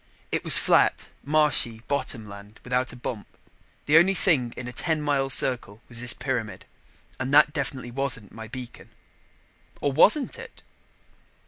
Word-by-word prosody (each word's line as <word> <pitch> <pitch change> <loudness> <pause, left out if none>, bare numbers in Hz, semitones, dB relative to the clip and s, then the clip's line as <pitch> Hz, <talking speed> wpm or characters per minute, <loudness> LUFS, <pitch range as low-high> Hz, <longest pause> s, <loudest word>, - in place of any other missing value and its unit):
It - - -2
was - - +9
flat, - - +1
marshy 140 -6 +2
bottom 130 -6 -3
land 100 +1 -13
without 125 0 -2
a - - -12
bump. 120 -3 -7 0.6
The 155 +2 +5
only 190 +3 +2
thing 140 -12 +1
in 125 - -7
a 125 - -8
ten 160 +1 -2
mile 140 -2 -1
circle 120 -6 +2
was 115 -1 -5
this 125 -1 -2
pyramid 115 -8 -5 0.5
and 130 0 -4
that 150 0 +5
definitely 130 -3 -5
wasn't 125 -5 -3
my 110 0 -10
beacon. 125 +2 -10 0.9
Or 145 - -1
wasn't 215 - +2
it? - - -13
130 Hz, 150 wpm, -24 LUFS, 115-145 Hz, 0.9 s, was